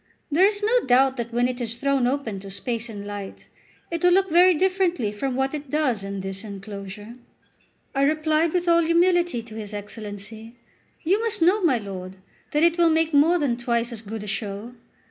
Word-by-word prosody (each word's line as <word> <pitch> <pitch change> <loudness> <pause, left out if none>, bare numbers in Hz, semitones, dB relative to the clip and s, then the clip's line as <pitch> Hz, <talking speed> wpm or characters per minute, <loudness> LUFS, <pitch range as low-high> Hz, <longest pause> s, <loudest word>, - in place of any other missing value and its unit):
There 360 +7 +5
is 415 0 -2
no 470 +4 +4
doubt 260 +1 +4
that 235 -1 -4
when 240 +1 +2
it 250 0 -4
is 230 -1 -2
thrown 275 0 +1
open 250 -7 -2
to 195 +1 -10
space 230 +4 -4
and 205 -2 -7
light, 205 -1 -7 0.5
it 335 0 -3
will 355 - +6
look 385 -1 +2
very 355 +2 +6
differently 360 - +1
from 255 +5 -3
what 265 +2 0
it 295 -2 -6
does 260 -8 0
in 195 0 -5
this 195 +1 -6
enclosure." 200 +1 -8 0.8
I 275 - 0
replied 310 +2 +2
with 355 0 -1
all 335 0 +5
humility 345 -5 +2
to 225 -1 -12
his 215 -1 -6
Excellency: 210 +2 -8 0.5
"You 375 +6 +2
must 455 -7 0
know, 380 +5 +4
my 310 -9 +3
lord, 190 -3 -7 0.3
that 300 +2 +1
it 340 0 +3
will 340 -1 +5
make 320 0 +1
more 310 +5 +5
than 275 -7 0
twice 240 0 -1
as 225 -2 -5
good 220 0 -6
a - - -8
show. 205 +3 -4
250 Hz, 200 wpm, -24 LUFS, 210-335 Hz, 0.8 s, will